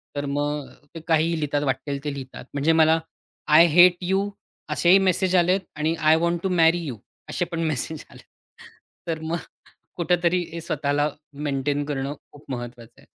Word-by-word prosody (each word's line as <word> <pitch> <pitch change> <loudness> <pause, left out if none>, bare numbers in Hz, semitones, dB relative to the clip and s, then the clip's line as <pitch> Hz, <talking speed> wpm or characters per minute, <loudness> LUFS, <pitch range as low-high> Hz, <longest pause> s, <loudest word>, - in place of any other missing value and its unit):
तर 145 0 -2
मग 145 0 -2 0.3
ते - - -5
काहीही 165 0 +2
लिहितात 145 -2 -1
वाटेल 140 +1 -2
ते 145 -1 -3
लिहितात. 130 -2 -9
म्हणजे 145 +3 +2
मला 160 0 +4 0.6
आय 165 - +9
हेट 175 0 +8
यू 190 +3 0 0.4
असेही 175 +2 +5
मेसेज 185 0 +1
आलेत 180 +2 +3 0.2
आणि 155 +2 0
I 155 -1 +4
want 170 0 0
to 190 - 0
marry 170 -1 +4
you 130 -6 -5 0.3
असे 175 - -1
पण 165 - -3
मेसेज 155 +1 -3
आलेत. - - -15 0.8
तर 165 -1 -2
मग 160 +2 -2 0.6
कुठेतरी 175 0 +1
हे 170 - -5
स्वतःला 145 -2 0 0.4
मेंटेन 140 +1 -1
करणं 140 -1 -3 0.2
खूप 145 -1 -16
महत्त्वाचं 120 -2 -8
आहे. - - -22
155 Hz, 165 wpm, -24 LUFS, 145-170 Hz, 0.8 s, आय